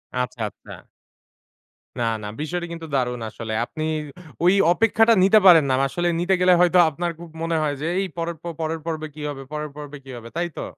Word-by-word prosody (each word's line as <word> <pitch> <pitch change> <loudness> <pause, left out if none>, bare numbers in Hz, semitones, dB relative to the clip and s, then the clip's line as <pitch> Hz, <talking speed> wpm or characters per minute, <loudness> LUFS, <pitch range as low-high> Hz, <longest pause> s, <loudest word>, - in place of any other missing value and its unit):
আচ্ছা, 125 -1 -3
আচ্ছা। - - -13 1.1
না, - - 0 0.2
না, - - -4
বিষয়টা 175 +2 -3
কিন্তু 165 -1 -8
দারুন 125 -2 -1
আসলে। 110 0 -6
আপনি 155 - -6 0.6
ঐ - - +3 0.3
অপেক্ষাটা 225 +2 +4
নিতে 215 +3 +6
পারেন 165 -5 +9
না। - - +2
ম - - +2
আসলে 175 +6 -2
নিতে 180 +2 +1
গেলে 180 0 +6
হয়তো 180 0 +4
আপনার 170 +3 -3
খুব 170 -1 -10
মনে 165 0 0
হয় 150 -2 0
যে 160 - -2
এই 195 - -1
পরের 165 0 -3
প - - -14 0.2
পরের 160 0 -2
পর্বে 155 -2 -3
কি 150 - -9
হবে 135 -1 -6
পরের 150 0 -4
পর্বে 150 -1 -8
কি 135 - -9
হবে, 115 0 -10
তাই 175 - 0
তো? - - -3
160 Hz, 205 wpm, -23 LUFS, 140-175 Hz, 1.1 s, পারেন